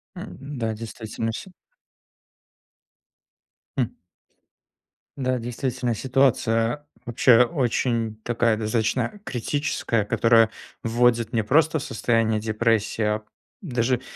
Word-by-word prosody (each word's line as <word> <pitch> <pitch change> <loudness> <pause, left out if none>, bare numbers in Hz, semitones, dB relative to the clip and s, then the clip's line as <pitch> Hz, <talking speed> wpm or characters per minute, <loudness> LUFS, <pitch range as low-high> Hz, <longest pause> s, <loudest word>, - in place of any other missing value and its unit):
Эм, 140 0 -8
да, 110 -1 -1
действительно 115 0 -5
все 190 - -7 2.3
М. - - 0 1.2
Да, 130 -1 0
действительно 125 +1 -2
ситуация, 125 +1 +1 0.2
вообще, 120 0 +5
очень 120 -5 0
такая 115 -2 +1
достаточно 115 - -1
критическая. 120 -3 -1
Которая 115 0 +4 0.3
вводит 120 +1 +2
не 110 -2 +2
просто 160 +7 +3
в - - -6
состояние 115 -1 +1
депрессии, 110 0 0
а 105 0 0 0.4
даже- 125 - 0
115 Hz, 95 wpm, -24 LUFS, 110-130 Hz, 2.3 s, вообще